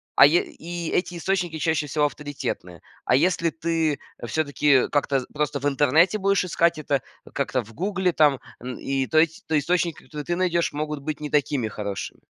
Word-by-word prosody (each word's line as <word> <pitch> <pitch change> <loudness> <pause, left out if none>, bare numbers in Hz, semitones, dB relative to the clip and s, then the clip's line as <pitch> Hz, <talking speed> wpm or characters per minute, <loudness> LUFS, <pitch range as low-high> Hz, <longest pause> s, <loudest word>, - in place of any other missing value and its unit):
а - - +9
е 160 +5 +4
и 170 0 -6
эти 180 0 0
источники 175 -3 -1
чаще 155 -2 0
всего 150 +1 +1
авторитетные. 145 - -5 0.2
А 125 - +4
если 165 +2 +2
ты, 160 -2 0 0.2
э, 120 - -5
всё-таки 145 0 +2
как-то, 145 -1 0
э, 130 - -3
просто 150 -1 -1
в - - -4
интернете 150 +8 +3
будешь 195 -1 +2
искать 170 -2 +2
это, 145 -2 -1 0.3
э, - - -13
как-то 130 -2 0
в 115 +1 -15
гугле, 190 - 0
там, 150 -5 +3 0.2
н 125 0 -6
и 135 -1 -1
то 155 - 0
есть, 160 0 0
то 160 - +2
источник, 170 +2 +1
который 150 -1 -8
ты 175 - -1
найдешь, 175 -3 +1
могут 150 0 -3
быть 150 +1 -5
не 150 - -4
такими 140 -5 +1
хорошими. 100 -2 -5
150 Hz, 195 wpm, -24 LUFS, 140-170 Hz, 0.3 s, а